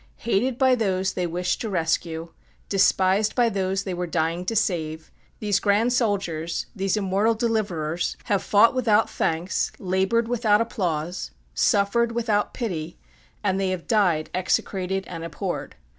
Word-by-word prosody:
Hated 235 +3 +1
by 260 -1 +4
those 190 -5 0
they 180 -1 -1
wished 180 +2 -1
to 225 - -3
rescue, 165 -2 -1 0.4
despised 195 +1 +3
by 240 -2 +3
those 195 -1 -1
they 190 - -4
were 180 0 -3
dying 165 +2 -1
to 225 - -2
save, 160 -6 -1 0.3
these 205 -2 +1
grand 215 +4 +2
soldiers, 190 -9 -1
these 195 +1 0
immortal 205 +3 +1
deliverers, 185 -8 -1
have 200 -2 0
fought 215 +4 +5
without 225 -4 +2
thanks, 165 +3 -1
labored 190 +5 +1
without 225 -3 +3
applause, 175 -6 -2 0.2
suffered 230 +2 +2
without 225 -3 0
pity, 170 -9 -4 0.5
and 195 -2 +1
they 195 -1 0
have 185 -2 -3
died 180 -8 +2
execrated 190 +1 -1
and 165 -2 -7
abhorred. 165 -2 -4
195 Hz, 145 wpm, -24 LUFS, 175-220 Hz, 0.5 s, fought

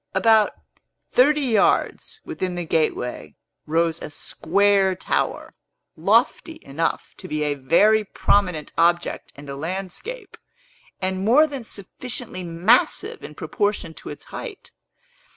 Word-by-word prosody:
About 215 +2 +4 0.6
thirty 295 +4 +4
yards 265 - +1
within 185 - -3
the 175 -1 -3
gateway 125 - -1 0.3
rose 165 +1 +1
a - - -6
square 195 +5 +2
tower, - - -2 0.4
lofty 325 -2 +2
enough 160 +4 -2
to 185 - -9
be 155 -3 -2
a 145 -1 +1
very 205 +11 +4
prominent 180 -6 0
object 170 +1 +1
in 140 - -11
the 140 -1 -6
landscape, 195 - -6 0.7
and 190 0 -1
more 255 +9 +6
than 280 -5 -6
sufficiently 220 0 -7
massive 180 +8 +1
in - - -9
proportion 205 -6 -2
to - - -9
its - - -9
height. 435 -6 -8
190 Hz, 120 wpm, -23 LUFS, 165-225 Hz, 0.7 s, more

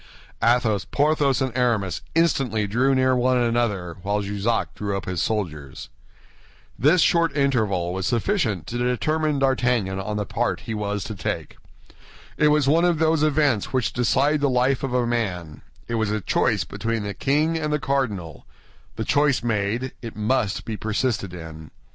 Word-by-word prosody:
Athos, 115 -3 +2
Porthos, 145 -3 +1
and 130 -2 -3
Aramis 110 -9 0
instantly 135 -10 +2
drew 125 +7 +2
near 130 0 +3
one 125 +1 +2
another, 115 -8 0
while 105 +2 -1
Jussac 100 +3 -1
drew 100 -1 -3
up 95 - -6
his 90 -2 -2
soldiers. 80 -12 -3 0.9
This 160 +7 +4
short 165 -4 +2
interval 105 -11 +1
was 95 +1 -2
sufficient 120 - 0
to 120 +8 -4
determine 150 +5 0
D'Artagnan 125 -8 +1
on 105 +2 -3
the 105 - -2
part - - -1
he 110 - -5
was 105 -2 -2
to 110 - -6
take. 95 - -4 0.8
It 150 - +3
was 150 -2 +3
one 160 +4 +4
of 175 -2 +3
those 160 0 +2
events 145 -8 +1
which 130 -3 0
decide 140 +5 +2
the 140 - +2
life 130 +1 +2
of 135 - -3
a 125 -1 +2
man; 95 -10 -3 0.3
it 115 - -4
was 110 -2 0
a 110 +1 -1
choice - - +1
between 115 -1 -3
the 100 0 -4
king 150 +9 +1
and 155 -2 -2
the 150 - +2
cardinal—the 115 - -5
choice 145 -4 +2
made, 115 +3 -1
it 115 -2 -7
must 110 -1 0
be 110 - -4
persisted 110 -1 -1
in. 80 -3 -9
120 Hz, 165 wpm, -23 LUFS, 100-135 Hz, 0.9 s, This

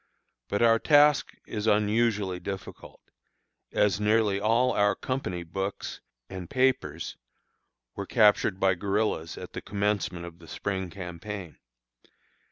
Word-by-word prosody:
But 100 - 0
our 115 -1 +5
task 145 +1 +5
is 105 0 -4
unusually 105 -3 +2
difficult, 95 +1 -8 0.7
as 105 -1 +2
nearly 105 -1 +2
all 115 +5 +3
our 100 -1 +2
company 95 -10 -3
books 95 +4 -4 0.3
and 95 -3 -7
papers 125 - 0 0.8
were 100 -1 -5
captured 105 -4 +4
by 95 -1 +4
guerillas 100 -3 -1
at - - -9
the - - -5
commencement 100 -4 -1
of 85 0 -11
the 85 - -14
spring 95 +2 -3
campaign. 90 0 -7
100 Hz, 120 wpm, -28 LUFS, 95-110 Hz, 0.8 s, our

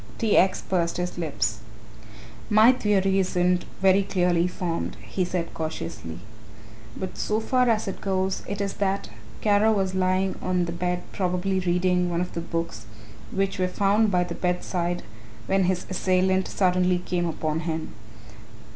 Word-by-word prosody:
T. 225 -3 +2
X. 190 0 +3
pursed 170 -3 0
his 180 0 -3
lips. 110 -9 -1 0.9
"My 215 +3 +7
theory 195 -5 +2
isn't 180 -1 +1 0.2
very 190 +1 +6
clearly 180 -3 +1
formed," 175 -2 -3
he 185 - -2
said 175 -1 -3
cautiously, 155 - -5 0.8
"but 185 - -5
so 215 +1 0
far 250 +2 +2
as 220 -2 +1
it 195 - -5
goes, 190 -1 0
it 200 0 -3
is 200 -1 -1
that 195 0 0 0.3
Kara 210 +1 +4
was 195 -3 0
lying 185 0 +1
on 180 -1 +1
the 170 - -4
bed 180 +1 -2
probably 185 0 0
reading 180 0 +1
one 170 -1 -1
of 180 0 -3
the 170 - -3
books 165 -5 -4 0.4
which 195 0 -1
were 185 - +2
found 205 +4 +2
by 180 -2 +2
the 175 -1 -5
bedside 175 0 -1 0.4
when 195 -1 +2
his 180 0 0
assailant 185 0 +1
suddenly 180 -1 +2
came 175 -1 -1
upon 155 -1 -2
him. 160 -1 -4
185 Hz, 155 wpm, -25 LUFS, 175-195 Hz, 0.9 s, My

